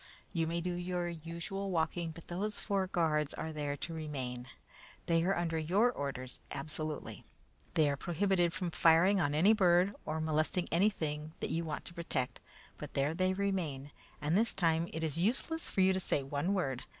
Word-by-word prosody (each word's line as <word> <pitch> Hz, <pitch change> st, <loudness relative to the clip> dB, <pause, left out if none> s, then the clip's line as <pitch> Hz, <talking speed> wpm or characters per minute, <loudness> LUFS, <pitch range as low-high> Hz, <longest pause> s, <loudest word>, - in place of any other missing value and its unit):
You 165 Hz, -3 st, +1 dB
may 170 Hz, +1 st, -1 dB
do 180 Hz, +1 st, -2 dB
your 175 Hz, 0 st, -2 dB
usual 170 Hz, +4 st, -4 dB
walking, 165 Hz, -1 st, 0 dB
but 160 Hz, +1 st, -11 dB
those 205 Hz, +4 st, -2 dB
four 195 Hz, -2 st, 0 dB
guards 155 Hz, -4 st, +1 dB
are 160 Hz, -, -4 dB
there 145 Hz, -1 st, -2 dB
to 165 Hz, -, -5 dB
remain. 130 Hz, -6 st, -4 dB, 0.6 s
They 165 Hz, -1 st, +3 dB
are 195 Hz, +3 st, +2 dB
under 165 Hz, -2 st, 0 dB
your 195 Hz, +10 st, +3 dB
orders 130 Hz, -, -5 dB
absolutely. 155 Hz, +1 st, -4 dB, 0.5 s
They 155 Hz, -2 st, +5 dB
are 140 Hz, -1 st, 0 dB
prohibited 175 Hz, +1 st, +1 dB
from 175 Hz, 0 st, -2 dB
firing 170 Hz, +5 st, +5 dB
on 145 Hz, -2 st, +1 dB
any 190 Hz, +8 st, +6 dB
bird 185 Hz, -1 st, +4 dB
or 155 Hz, +1 st, -2 dB
molesting 155 Hz, +3 st, 0 dB
anything 160 Hz, -5 st, +1 dB
that -, -, -2 dB
you 165 Hz, -, 0 dB
want 150 Hz, -2 st, -4 dB
to -, -, -9 dB
protect, 150 Hz, -7 st, -2 dB, 0.4 s
but -, -, -8 dB
there 140 Hz, +3 st, +2 dB
they 185 Hz, +2 st, +1 dB
remain, 170 Hz, -9 st, -2 dB, 0.3 s
and 150 Hz, +3 st, +2 dB
this 225 Hz, +4 st, +2 dB
time 165 Hz, -2 st, +2 dB
it 160 Hz, -, -3 dB
is 160 Hz, -1 st, -1 dB
useless 265 Hz, -, 0 dB
for 190 Hz, -, +1 dB
you 190 Hz, 0 st, +5 dB
to 190 Hz, -, 0 dB
say 145 Hz, -6 st, +1 dB
one 145 Hz, +8 st, -1 dB
word. 135 Hz, -9 st, -1 dB
165 Hz, 185 wpm, -33 LUFS, 150-185 Hz, 0.6 s, any